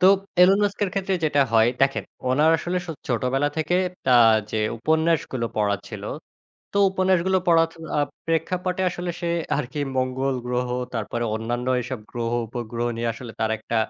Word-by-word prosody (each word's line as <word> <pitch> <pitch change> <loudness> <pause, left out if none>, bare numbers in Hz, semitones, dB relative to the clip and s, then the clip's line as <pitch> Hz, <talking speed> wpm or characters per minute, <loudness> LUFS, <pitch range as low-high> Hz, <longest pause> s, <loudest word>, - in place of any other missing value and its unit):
তো 185 - +6 0.4
এলন 195 +3 +6
মাস্কের 205 0 0
ক্ষেত্রে 195 -1 -1
যেটা 145 -2 +3
হয় 110 0 +5
দেখেন, 135 0 +2 0.3
উনার 150 +5 +4
আসলে 180 +2 -2
সো 165 - -4 0.2
ছোটবেলা 130 +4 +1
থেকে 160 +3 +1 0.4
আ - - +8 0.3
যে 110 - -1 0.2
উপন্যাসগুলো 160 -3 +1
পড়া 105 -1 +2
ছিল, - - -7 0.7
তো - - 0
উপন্যাসগুলো 190 0 +2
পড়া 165 -1 +6
ত - - -17 0.2
আ - - +3 0.3
প্রেক্ষাপটে 180 +3 -1
আসলে 175 0 -5
সে 170 -1 -2 0.3
আরকি 150 +1 -4 0.2
মঙ্গল 130 +1 0
গ্রহ, 125 0 -1 0.3
তারপরে 115 +1 -2
অন্যান্য 120 +3 -3
এসব 125 0 -5
গ্রহ-উপগ্রহ 120 0 -2
নিয়ে 115 0 -1
আসলে 115 0 -9
তার 110 0 +1
একটা 110 +2 -5
135 Hz, 155 wpm, -24 LUFS, 120-175 Hz, 0.7 s, আ